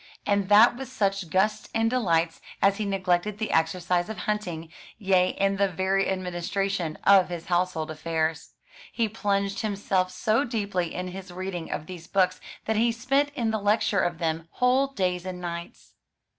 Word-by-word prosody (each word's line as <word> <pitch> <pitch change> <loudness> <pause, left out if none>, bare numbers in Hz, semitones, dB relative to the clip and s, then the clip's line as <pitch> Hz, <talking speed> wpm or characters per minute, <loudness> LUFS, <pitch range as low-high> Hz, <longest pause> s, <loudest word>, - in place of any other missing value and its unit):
And 200 -1 +1
that 210 +3 +7
with 265 -1 -7
such 195 -7 -1
gusts 195 +5 +1
and 225 0 +2
delights, 170 -9 +1 0.2
as 195 0 +3
he 215 - -2
neglected 195 0 0
the 220 0 -3
exercise 175 +3 +1
of 220 - -5
hunting; 175 -5 -3 0.2
yea 190 -3 +2
and 195 0 +1
the 200 - +4
very 190 +2 0
administration 185 -1 -2
of 195 -2 +6
his 170 -2 -5
household 175 -3 0
affairs. 160 0 -2 0.4
He 230 -2 0
plunged 200 -2 -1
himself 195 -3 0
so 215 +7 +1
deeply 200 - -2
in 180 0 -3
his 190 0 -8
reading 180 -2 -5
of 150 - -3
these 175 -1 -9
books 185 -2 +1 0.2
that 220 -1 0
he 230 +2 +3
spent 270 +5 +1
in 230 -4 0
the 220 - -1
lecture 205 0 +2
of 175 -2 0
them 165 0 -2
whole 255 +2 +3
days 180 -9 -1
and 185 -1 -6
nights. 170 -1 -7
190 Hz, 170 wpm, -26 LUFS, 175-210 Hz, 0.4 s, that